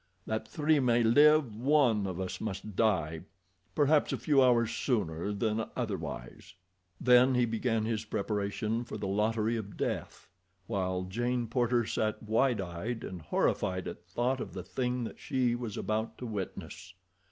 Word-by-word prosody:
That 110 Hz, 0 st, -3 dB
three 155 Hz, -1 st, +2 dB
may 120 Hz, -2 st, +3 dB
live, 145 Hz, 0 st, +5 dB
one 120 Hz, -5 st, +3 dB
of 95 Hz, -1 st, -4 dB
us 95 Hz, -1 st, -4 dB
must 105 Hz, -1 st, -5 dB
die 80 Hz, -8 st, +1 dB, 0.5 s
perhaps 150 Hz, 0 st, +3 dB
a 135 Hz, -, -1 dB
few 135 Hz, +4 st, +3 dB
hours 120 Hz, -3 st, +4 dB
sooner 100 Hz, -, -1 dB
than 110 Hz, +2 st, -1 dB
otherwise." -, -, -5 dB, 0.4 s
Then 125 Hz, +1 st, +5 dB
he 125 Hz, -1 st, +3 dB
began 115 Hz, -1 st, 0 dB
his 110 Hz, -1 st, -1 dB
preparation 105 Hz, +2 st, -2 dB
for 120 Hz, -, -7 dB
the -, -, -4 dB
lottery 110 Hz, +3 st, +1 dB
of 100 Hz, -2 st, -7 dB
death, -, -, -3 dB, 0.4 s
while 95 Hz, -4 st, -1 dB
Jane 120 Hz, +6 st, -1 dB
Porter 120 Hz, 0 st, +1 dB
sat 110 Hz, 0 st, -1 dB
wide 115 Hz, +2 st, +2 dB
eyed 95 Hz, +6 st, -4 dB
and 90 Hz, -2 st, -6 dB
horrified 90 Hz, +4 st, 0 dB
at -, -, -7 dB
thought 125 Hz, +2 st, -1 dB
of -, -, -6 dB
the 95 Hz, -2 st, -5 dB
thing 125 Hz, +5 st, -2 dB
that 115 Hz, -, -7 dB
she 130 Hz, -4 st, 0 dB
was 120 Hz, -4 st, -4 dB
about 110 Hz, +3 st, -2 dB
to 125 Hz, -, -6 dB
witness. 95 Hz, -4 st, -6 dB
115 Hz, 155 wpm, -31 LUFS, 100-125 Hz, 0.5 s, live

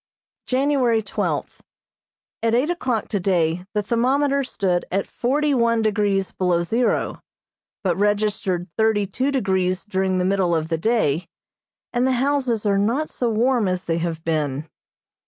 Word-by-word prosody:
January 255 Hz, -4 st, +2 dB
twelfth: 195 Hz, -, -3 dB, 0.8 s
At 230 Hz, 0 st, +2 dB
eight 275 Hz, +8 st, +2 dB
o'clock 255 Hz, -, -1 dB
today 180 Hz, -3 st, 0 dB
the 210 Hz, -, +1 dB
thermometer 270 Hz, +5 st, +1 dB
stood 190 Hz, -8 st, -1 dB
at 195 Hz, +2 st, 0 dB
forty 290 Hz, +4 st, 0 dB
one 230 Hz, -2 st, +2 dB
degrees 205 Hz, -3 st, +1 dB
below 180 Hz, -2 st, +1 dB
zero, 230 Hz, +7 st, 0 dB, 0.6 s
but 180 Hz, -3 st, +1 dB
registered 205 Hz, -3 st, 0 dB
thirty 220 Hz, -2 st, +3 dB
two 260 Hz, +8 st, -1 dB
degrees 190 Hz, -7 st, 0 dB
during 190 Hz, -2 st, 0 dB
the 180 Hz, -, +1 dB
middle 185 Hz, -3 st, +2 dB
of 160 Hz, 0 st, -2 dB
the 165 Hz, -, 0 dB
day, 180 Hz, -6 st, +1 dB, 0.7 s
and 245 Hz, +1 st, +2 dB
the 260 Hz, -, +2 dB
houses 255 Hz, -4 st, 0 dB
are 200 Hz, -1 st, +2 dB
not 240 Hz, +10 st, 0 dB
so 245 Hz, -, -1 dB
warm 235 Hz, 0 st, +2 dB
as 185 Hz, 0 st, -1 dB
they 165 Hz, -1 st, -1 dB
have 165 Hz, -1 st, -3 dB
been. 150 Hz, -2 st, -1 dB
210 Hz, 145 wpm, -22 LUFS, 185-245 Hz, 0.8 s, thirty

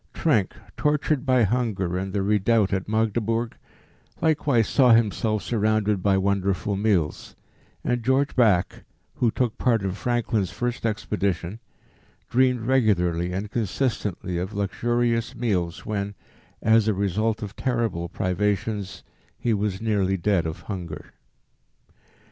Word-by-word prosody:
Trenck, 115 Hz, -, +1 dB, 0.2 s
tortured 150 Hz, -1 st, 0 dB
by 130 Hz, -2 st, +4 dB
hunger 105 Hz, -5 st, 0 dB
in 95 Hz, +1 st, -3 dB
the 100 Hz, 0 st, -1 dB
redoubt 105 Hz, 0 st, +2 dB
at 95 Hz, +1 st, -2 dB
Magdeburg, 115 Hz, +1 st, 0 dB, 0.6 s
likewise 145 Hz, -8 st, +2 dB
saw 125 Hz, -4 st, +5 dB
himself 110 Hz, -1 st, +1 dB
surrounded 105 Hz, -3 st, +1 dB
by 95 Hz, 0 st, +3 dB
wonderful 100 Hz, 0 st, 0 dB
meals, 95 Hz, -7 st, 0 dB, 0.5 s
and 120 Hz, -1 st, 0 dB
George 130 Hz, +4 st, +1 dB
Back, 105 Hz, -8 st, +2 dB, 0.3 s
who 120 Hz, -, +3 dB
took 120 Hz, 0 st, -1 dB
part 115 Hz, -5 st, +2 dB
in 95 Hz, -, -1 dB
Franklin's 110 Hz, -2 st, -1 dB
first 120 Hz, -1 st, -2 dB
expedition, 100 Hz, -2 st, -2 dB, 0.7 s
dreamed 125 Hz, -1 st, +3 dB
regularly 90 Hz, -9 st, +1 dB
and 100 Hz, +3 st, -4 dB
consistently 105 Hz, -6 st, -2 dB
of 95 Hz, +4 st, -4 dB
luxurious 115 Hz, +3 st, 0 dB
meals 90 Hz, -8 st, -1 dB
when, 100 Hz, -1 st, -3 dB, 0.5 s
as 110 Hz, 0 st, +4 dB
a 110 Hz, -, +2 dB
result 105 Hz, +3 st, 0 dB
of 105 Hz, 0 st, -7 dB
terrible 115 Hz, -9 st, -1 dB
privations, 100 Hz, +1 st, -2 dB, 0.3 s
he 120 Hz, -, 0 dB
was 105 Hz, 0 st, -2 dB
nearly 100 Hz, -3 st, +1 dB
dead 90 Hz, -2 st, +1 dB
of 80 Hz, -, -6 dB
hunger." 85 Hz, -7 st, -7 dB
105 Hz, 125 wpm, -24 LUFS, 95-115 Hz, 0.7 s, saw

